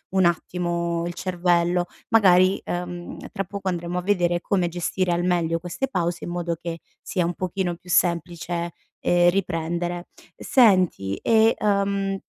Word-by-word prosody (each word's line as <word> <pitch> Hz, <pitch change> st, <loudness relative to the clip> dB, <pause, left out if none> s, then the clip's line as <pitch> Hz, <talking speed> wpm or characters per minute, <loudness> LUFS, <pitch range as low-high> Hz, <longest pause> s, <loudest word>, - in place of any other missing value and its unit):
un 190 Hz, -, +4 dB
attimo 170 Hz, 0 st, -1 dB
il 175 Hz, -, -4 dB
cervello. 175 Hz, -1 st, +1 dB, 0.2 s
Magari, 190 Hz, -4 st, +5 dB
ehm, 175 Hz, 0 st, -5 dB
tra 195 Hz, -, -2 dB
poco 200 Hz, 0 st, -6 dB
andremo 175 Hz, 0 st, -3 dB
a 180 Hz, -, 0 dB
vedere 175 Hz, -3 st, +1 dB
come 185 Hz, -2 st, +1 dB
gestire 175 Hz, +1 st, -1 dB
al 175 Hz, -, 0 dB
meglio 170 Hz, -2 st, +1 dB
queste 175 Hz, +10 st, -3 dB
pause 175 Hz, -5 st, -2 dB
in -, -, -5 dB
modo 175 Hz, -1 st, -2 dB
che 170 Hz, -1 st, -5 dB, 0.2 s
sia 180 Hz, -2 st, -1 dB
un 175 Hz, -, -1 dB
pochino 185 Hz, -1 st, -2 dB
più 180 Hz, +1 st, -18 dB
semplice, 170 Hz, 0 st, 0 dB, 0.3 s
ehm, 175 Hz, 0 st, +4 dB
riprendere. 175 Hz, -1 st, -2 dB, 0.3 s
Senti 185 Hz, -, +3 dB
e, 225 Hz, 0 st, +4 dB
ehm, 200 Hz, -1 st, 0 dB
175 Hz, 145 wpm, -24 LUFS, 170-185 Hz, 0.3 s, Magari